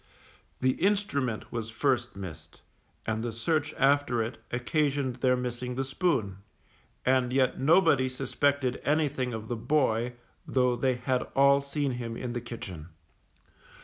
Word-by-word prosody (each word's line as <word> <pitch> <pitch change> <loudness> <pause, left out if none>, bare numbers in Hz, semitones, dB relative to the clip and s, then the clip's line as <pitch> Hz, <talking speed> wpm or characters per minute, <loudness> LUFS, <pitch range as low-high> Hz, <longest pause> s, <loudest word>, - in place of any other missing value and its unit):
The 130 0 +4
instrument 165 - 0
was 115 -2 -3
first 120 0 0
missed, 80 -5 -9 0.4
and 110 0 -1
the 120 - -2
search 155 +6 0
after 135 -4 +3
it 115 +3 -6
occasioned 135 +1 0
their 125 0 +2
missing 125 0 -3
the 135 - 0
spoon; 130 - 0 0.7
and 130 -1 +3
yet 130 -1 +2
nobody 140 -3 +4
suspected 135 0 0
anything 145 -3 +1
of 110 -1 -5
the 120 - -2
boy, 120 -2 +1 0.3
though 125 -2 +2
they 130 +1 +1
had 125 +1 0
all 140 0 +5
seen 140 0 -1
him 120 -2 -4
in 125 -2 -4
the 120 - -3
kitchen. 110 -9 -7
125 Hz, 140 wpm, -29 LUFS, 120-140 Hz, 0.7 s, all